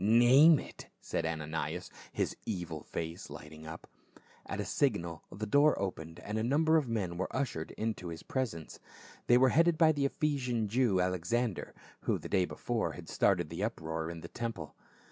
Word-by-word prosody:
"Name 125 +9 +7
it," - - -9
said 80 - -2
Ananias, 80 -1 -3 0.2
his - - -1
evil 85 -7 -3
face 80 +2 -5
lighting 80 +1 -10
up. 80 +1 -8 0.6
At - - -4
a - - -1
signal 85 -2 0
the 105 +3 -4
door 145 +8 +4
opened 85 -4 -4
and 105 +4 -3
a - - 0
number 155 +6 +3
of 150 -5 0
men 100 -7 -2
were 95 - 0
ushered 130 - -2
into 110 -5 -2
his 80 -1 -7
presence. 115 - -3 0.5
They 120 - +7
were 130 +1 +5
headed 165 +3 +4
by 160 -1 +6
the 145 -2 0
Ephesian 130 -7 -1
Jew, 115 -3 +2
Alexander, 90 +5 -1 0.2
who - - 0
the - - -8
day 95 -2 +3
before - - -2
had - - -10
started 85 -5 +2
the 85 +4 -3
uproar 80 -6 -3
in 85 -1 -7
the - - -7
temple. 115 -11 -5
100 Hz, 175 wpm, -32 LUFS, 85-125 Hz, 0.6 s, Name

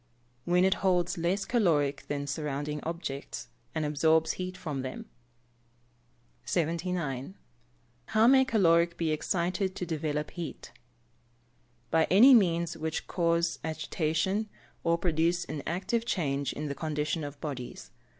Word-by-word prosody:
_ - - -37 0.4
When 180 +1 +3
it 190 - +4
holds 180 -3 +1
less 180 +4 0
caloric 150 - +1
than 145 -1 -2
surrounding 145 0 -3
objects, 140 -7 -5 0.3
and 155 -1 0
absorbs 160 +2 +3
heat 185 0 -5
from 150 -7 -4
them. 130 0 -6 1.4
79. 170 -3 -2 0.7
How 220 0 +3
may 265 +2 +7
caloric 170 -8 +3
be 165 -2 0
excited 180 +4 -1
to 180 - -3
develop 150 -2 -2
heat? 170 -3 -7 1.2
By 160 0 +4
any 240 +9 +7
means 170 -6 +3
which 160 0 -3
cause 170 -1 +1
agitation, 160 +6 -1 0.3
or 170 0 +2
produce 170 0 +1
an 150 - -5
active 195 +7 -1
change 145 - -1
in 150 - -5
the 140 - -2
condition 155 +1 -2
of 145 0 -7
bodies. 125 - -6
165 Hz, 130 wpm, -29 LUFS, 150-180 Hz, 1.4 s, may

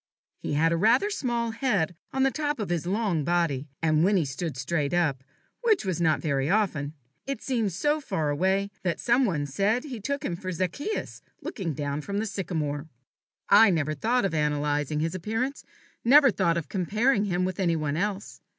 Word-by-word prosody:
He - - -4
had 165 +3 +3
rather 230 - +4
a 415 - -2
small 235 - -1
head 215 - 0 0.2
on 265 - +1
the 270 - +3
top 295 0 -1
of 210 - -3
his 175 -1 -1
long 195 -5 0
body; 160 -4 0 0.2
and 155 0 +3
when 200 +2 +4
he 165 - +1
stood 140 +1 -4
straight 145 +3 -1
up, 145 -7 +1 0.4
which 440 - +2
was 180 -2 -1
not 160 -2 +2
very 140 -2 0
often, 160 -8 0 0.3
it 275 - -4
seemed 230 -7 0
so 295 - 0
far 155 - -1
away, 190 +6 +1
that 175 -2 -1
some 250 +2 +3
one 160 -9 -1
said 200 - 0
he 265 -6 -6
took 280 +6 -3
him 170 - -1
for 185 +2 -5
Zacchaeus 185 - -3 0.2
looking 170 - -4
down 145 +1 -3
from 200 +6 -4
the 215 - 0
sycomore. 160 -8 -3 0.6
I 225 - +7
never 155 -4 0
thought 230 - +1
of 190 - -1
analyzing 150 0 0
his 160 +1 -1
appearance, 225 +9 -3 0.4
never 275 +2 +7
thought 170 -4 +1
of 165 -3 -3
comparing 210 - +1
him 180 -2 0
with 185 0 -4
any 170 -3 +2
one 150 -2 -1
else. 200 +3 -3
185 Hz, 190 wpm, -27 LUFS, 155-225 Hz, 0.6 s, I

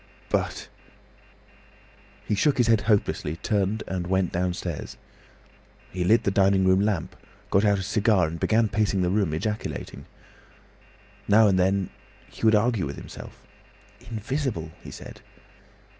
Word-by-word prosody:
"But—" - - -1 1.6
He - - -1
shook 140 +8 +2
his 120 - +3
head 115 -2 +3
hopelessly, 105 -7 0
turned, 100 +3 -1
and 90 -2 -3
went 95 -1 +1
downstairs. 90 -2 -3 0.9
He 90 -1 -2
lit 110 +6 +4
the 100 - +1
dining 95 -1 +3
room 95 0 +4
lamp, 100 -4 -1 0.4
got 100 - +3
out 100 -1 +3
a 95 - -3
cigar, 105 -2 +2
and 80 +1 -5
began 110 0 +2
pacing 100 -2 0
the 90 - +1
room, 100 -5 +1
ejaculating. 105 +8 -4 1.2
Now 105 +1 +6
and 95 -2 +3
then 95 0 +1 0.4
he - - -15
would 110 -1 +5
argue 105 - +1
with 70 - -6
himself. - - -11 0.7
"Invisible!" 110 - -3
he - - -9
said. - - -11
100 Hz, 140 wpm, -25 LUFS, 90-110 Hz, 1.6 s, Now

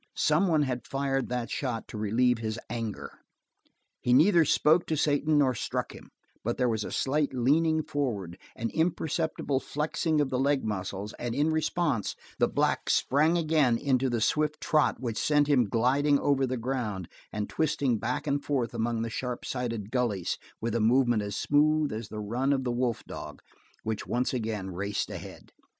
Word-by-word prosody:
Some 155 +6 +3
one 155 -4 +3
had 125 -3 -3
fired 135 -1 -1
that 120 -2 -3
shot 120 -5 -3
to - - -7
relieve 115 +3 +2
his 110 0 -3
anger. 115 -3 -5 0.8
He 125 - +1
neither 165 +4 +6
spoke 160 +4 +3
to 160 - 0
Satan 150 +1 +2
nor 135 -3 +4
struck - - -3
him, - - -13 0.3
but 120 +2 -1
there 125 - +2
was 110 -3 0
a - - -6
slight 140 0 0
leaning 155 +6 +2
forward, 105 - -3 0.2
an 115 0 -3
imperceptible 160 -3 0
flexing 155 +2 -1
of 145 -2 +1
the 125 - 0
leg 140 -1 +1
muscles, 100 0 -4
and 120 -1 -3
in 150 +2 +2
response 155 - 0 0.2
the - - +4
black - - 0
sprang 155 +5 +3
again 155 -7 +3
into 130 0 +1
the 120 -2 -1
swift 150 +6 +1
trot 155 -1 +2
which 115 -4 -3
sent 150 -1 +4
him 130 -7 +3
gliding 135 +6 +3
over 135 -2 +1
the 130 0 -2
ground, 115 -7 -3 0.2
and 105 -1 -3
twisting 140 -7 0
back 125 +7 -2
and 145 -1 0
forth 130 -5 -1
among 115 0 -1
the 115 - -3
sharp 125 +1 -4
sided 115 -5 -3
gullies 115 -8 -1 0.2
with 115 0 -2
a 115 - +1
movement 120 0 +3
as 100 -1 -4
smooth 150 +1 +2
as 110 0 -5
the 110 - -6
run 120 +7 -1
of 135 -1 0
the 125 - -1
wolf 120 -2 -1
dog, - - -8 0.4
which 110 -1 -3
once 125 +2 0
again 110 -6 -3
raced 100 +3 -3
ahead. - - -9
125 Hz, 180 wpm, -28 LUFS, 115-145 Hz, 0.8 s, neither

